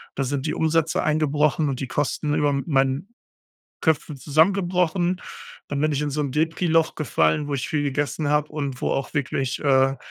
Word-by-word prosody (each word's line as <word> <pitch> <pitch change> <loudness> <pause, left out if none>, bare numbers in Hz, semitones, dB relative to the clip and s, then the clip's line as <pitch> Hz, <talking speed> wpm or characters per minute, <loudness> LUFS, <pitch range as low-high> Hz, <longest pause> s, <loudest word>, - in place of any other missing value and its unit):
Da 135 - -1
sind 135 +1 -2
die - - -1
Umsätze 160 0 +1
eingebrochen 150 0 +1
und 130 -2 -3
die 135 - -3
Kosten 145 +2 -1
über 145 0 +2
m 140 -1 -1
meinen 135 +2 +1 0.7
Köpfen 155 -2 0
zusammengebrochen. 175 +3 +1 0.5
Dann 145 - -3
bin 155 +1 +1
ich 145 -1 -1
in 150 - -1
so 145 +2 -2
'n 140 -3 -2
Depri-Loch 165 +2 +1
gefallen, 130 - +1
wo 145 - -3
ich 135 -2 -2
viel 150 -2 0
gegessen 145 +1 -1
hab 150 0 +1
und 140 -4 -4
wo - - 0
auch 135 - -2
wirklich 135 -2 -1
äh, 135 -1 +3
150 Hz, 185 wpm, -23 LUFS, 140-160 Hz, 0.7 s, äh